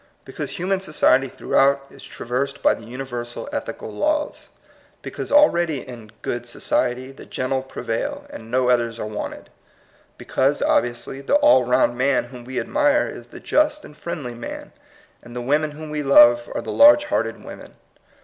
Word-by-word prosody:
Because - - -6
human 190 +2 0
society 135 -7 +2
throughout 140 +2 +1
is 135 - -15
trav - - -10
ersed 140 +3 -2
by - - +5
the 115 - -10
universal 120 - -6
ethical 290 - -5
laws. 300 0 -2 0.5
Be - - -6
cause - - -6
already 170 - +3
in 115 -4 -10
"good 120 0 -4
society" 125 +2 -1
the 135 - -14
gentle 130 +1 -2
prevail, 115 -3 -4
and 110 - -10
no 125 +1 +1
others 115 -2 0
are 110 - -4
wanted. 105 -1 -7 0.7
Be - - -12
cause, 140 +2 +1
obviously, 120 +3 0
the 280 - +1
all 290 - +5
round 120 0 +2
man 135 0 +2
whom 120 -1 -10
we 130 0 -3
admire 295 0 +2
is - - -10
the - - -12
just 300 0 +1
and 150 - -14
friendly 150 -7 -6
man, 295 - -8 0.5
and 120 0 -13
the - - -3
women 150 +5 +1
whom 150 +1 -9
we 150 0 -2
love 120 -4 +6
are - - -1
the - - -5
large 295 +1 +7
hearted 300 - -2
women. - - -11
135 Hz, 175 wpm, -22 LUFS, 120-170 Hz, 0.7 s, large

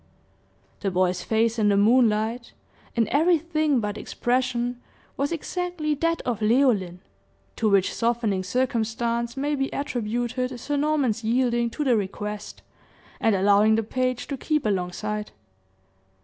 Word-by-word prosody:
The 200 - -1
boy's 180 -1 +1
face 225 +3 +1
in 210 -1 +3
the 200 - +3
moonlight, 225 +1 +2 0.4
in 230 -3 +2
everything 310 -2 +2
but 210 -1 -3
expression, 245 0 -1 0.3
was 280 +3 -1
exactly 340 -1 -2
that 330 +3 -1
of 230 -3 -2
Leoline, 215 -6 +2 0.6
to 220 - +2
which 195 -2 +3
softening 230 -5 0
circumstance 235 +1 -1
may 290 +2 -1
be 270 -1 -1
attributed 245 0 -2
Sir 290 +4 -3
Norman's 285 -6 +1
yielding 240 0 +1
to 295 +6 -3
the 255 -4 +3
request, 210 +1 -5 0.6
and 225 -2 +2
allowing 205 +3 +4
the 225 - +1
page 255 +2 -1
to 280 - -3
keep 300 +1 -1
along 180 -4 0
side. 210 +1 -4
235 Hz, 135 wpm, -25 LUFS, 210-265 Hz, 0.6 s, allowing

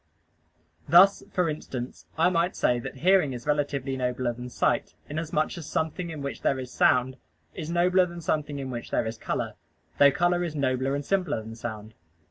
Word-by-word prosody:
Thus, 185 +5 +7
for 180 -2 +1
instance, 130 -5 -5
I 165 +2 +4
might 170 +1 +1
say 120 -1 +2
that 120 - -7
hearing 185 -8 +4
is 120 -1 -7
relatively 145 -2 0
nobler 125 -1 -1
than 125 +1 -8
sight, - - 0
inasmuch 155 +1 -2
as 155 - -8
something 160 +2 -2
in 155 -3 -6
which 140 - -5
there 135 - +1
is 130 -1 -6
sound 130 +1 +3 0.4
is 160 -3 -6
nobler 180 +2 +3
than 170 0 -8
something 150 -2 -1
in 135 -1 -4
which 120 -1 -6
there - - 0
is 110 0 -5
color, - - -2 0.5
though 140 0 +8
color 175 +3 +1
is 165 -3 -4
nobler 135 -1 0
and 145 0 -4
simpler 180 - 0
than 110 +1 -8
sound. 110 -2 -7
145 Hz, 185 wpm, -27 LUFS, 125-170 Hz, 0.5 s, though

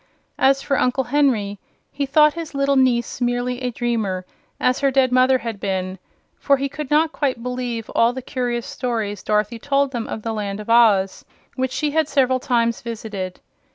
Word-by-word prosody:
As 275 0 +3
for 275 -2 0
Uncle 255 +1 +1
Henry, 240 -7 +1 0.3
he 280 -1 -2
thought 300 +2 +5
his 330 -3 -7
little 275 0 +2
niece 250 -2 +1
merely 245 +1 -1
a 250 - -1
dreamer, 220 -6 -2 0.3
as 250 0 +2
her 275 - +3
dead 265 -1 +2
mother 255 +1 +4
had 230 -4 -6
been, 190 -1 -3 0.4
for 280 -1 +3
he 275 +1 -1
could 285 0 -6
not 310 +1 +3
quite 260 -7 -2
believe 245 -3 -3
all 230 +1 +3
the 260 0 -7
curious 245 -2 -2
stories 220 -5 -3
Dorothy 215 +2 0
told 280 +1 +1
them 235 -3 -4
of 220 - -6
the 225 - -2
Land 205 -2 -3
of 210 +2 -4
Oz, 210 -5 +4 0.3
which 260 0 -1
she 300 +1 -1
had 315 0 +1
several 260 -3 +2
times 235 -2 0
visited. 215 -5 -6
250 Hz, 185 wpm, -21 LUFS, 225-275 Hz, 0.4 s, thought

